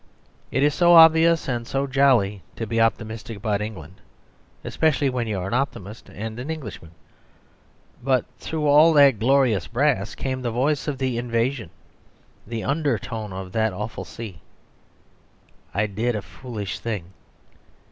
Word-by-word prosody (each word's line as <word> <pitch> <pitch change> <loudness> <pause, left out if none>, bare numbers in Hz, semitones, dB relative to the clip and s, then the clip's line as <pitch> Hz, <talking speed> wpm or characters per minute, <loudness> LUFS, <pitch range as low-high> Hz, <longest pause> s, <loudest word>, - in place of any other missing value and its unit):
It 135 - 0
is 145 0 +3
so 175 +3 +4
obvious 165 0 +6
and 120 -3 -3
so 135 +1 -1
jolly 130 -8 +2
to 115 - -4
be 115 +1 0
optimistic 110 0 -2
about 105 -1 -1
England, 95 -5 -8 0.6
especially 145 -3 +1
when 120 -2 -2
you 105 -3 -2
are 90 - -3
an 100 - -4
optimist 115 -6 -3
and 110 +2 -7
an 130 +5 -6
Englishman. 155 - -7 1.1
But 130 -1 +1
through 155 -2 -3
all 150 +3 +6
that 140 -7 +6
glorious 120 -6 +2
brass 120 -5 0
came 130 -1 -3
the 120 - -2
voice 135 +7 0
of 145 -3 -2
the 130 -3 -1
invasion, 120 -2 -1 0.8
the 115 -1 -4
undertone 120 -7 -2
of 95 0 -7
that 110 -1 0
awful 105 +4 -5
sea. 105 -7 -9 1.3
I 105 +2 0
did 110 +4 -2
a 105 - -4
foolish 105 -1 -7
thing. 95 -6 -5
120 Hz, 145 wpm, -23 LUFS, 105-140 Hz, 1.3 s, obvious